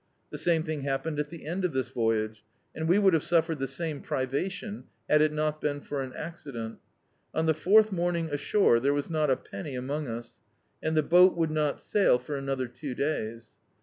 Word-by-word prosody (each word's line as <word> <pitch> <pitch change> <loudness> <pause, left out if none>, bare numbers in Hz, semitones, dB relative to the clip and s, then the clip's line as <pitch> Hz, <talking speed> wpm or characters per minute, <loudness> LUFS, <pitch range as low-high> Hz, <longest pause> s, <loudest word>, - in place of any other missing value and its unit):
The - - -5
same 165 -2 +2
thing 155 -3 -3
haf^iened 140 +3 -2
at 150 0 -2
the 170 -3 -10
end 175 +5 -2
of 180 - 0
this 130 -2 -1
voyage, 110 -2 -1 0.3
and 160 0 -3
we 180 - +5
would 195 -3 +5
have 160 - +3
suffered 165 -2 +1
the 135 - -1
same 150 +2 -4
pri 130 - -1
vation 185 - -4
— - - -44
had 150 - +5
it 155 0 +4
not 155 0 -1
been 145 -1 -1
for 145 -1 -4
an 130 -1 -5
accident 135 -9 -6 0.6
On 160 - +1
the 160 - +4
fourth 210 +8 +5
morning 175 -2 0
ashore 145 - +3
there 140 +4 +2
was 145 +3 -2
not 155 -2 +1
a 130 - +3
penny 145 -7 -7
among 140 +4 -3
us, 115 0 -7 0.4
and 160 0 0
the 155 - +4
boat 180 +3 +6
would 165 -2 +1
not 150 -2 0
sail 200 -11 +3
for 125 +4 -6
another 135 -2 -2
two 125 +2 -7
days. 115 -6 -3
150 Hz, 215 wpm, -28 LUFS, 135-165 Hz, 0.6 s, boat